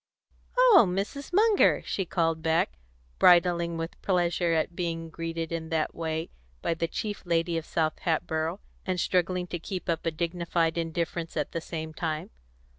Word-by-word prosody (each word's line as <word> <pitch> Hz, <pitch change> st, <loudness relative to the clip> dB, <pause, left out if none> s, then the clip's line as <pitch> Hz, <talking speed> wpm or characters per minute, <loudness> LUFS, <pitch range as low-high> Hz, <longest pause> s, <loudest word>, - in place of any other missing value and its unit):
"Oh, 480 Hz, -, +8 dB
Mrs. 200 Hz, -, -3 dB
Munger!" 420 Hz, +3 st, +4 dB
she 195 Hz, -, -2 dB
called 165 Hz, -2 st, 0 dB
back, 160 Hz, -, +1 dB, 0.4 s
bridling 170 Hz, -1 st, +5 dB
with 165 Hz, +1 st, -5 dB
pleasure 175 Hz, -2 st, +1 dB
at 165 Hz, +1 st, 0 dB
being 165 Hz, -2 st, -3 dB
greeted 165 Hz, 0 st, -4 dB
in 165 Hz, -1 st, -3 dB
that 160 Hz, -1 st, 0 dB
way 160 Hz, 0 st, -3 dB, 0.3 s
by -, -, +1 dB
the 165 Hz, 0 st, -1 dB
chief 210 Hz, +4 st, -4 dB
lady 170 Hz, 0 st, +1 dB
of 165 Hz, -1 st, -3 dB
South 155 Hz, -2 st, 0 dB
Hatboro', 165 Hz, +1 st, -1 dB, 0.2 s
and 185 Hz, -1 st, -1 dB
struggling 180 Hz, +1 st, +1 dB
to 175 Hz, -1 st, -5 dB
keep 185 Hz, +2 st, -5 dB
up 165 Hz, -1 st, 0 dB
a -, -, +5 dB
dignified 170 Hz, 0 st, -1 dB
indifference 170 Hz, 0 st, -3 dB
at 150 Hz, -, -1 dB
the 165 Hz, -, -3 dB
same 160 Hz, -1 st, -5 dB
time. 155 Hz, -1 st, -3 dB
170 Hz, 160 wpm, -28 LUFS, 165-180 Hz, 0.4 s, Oh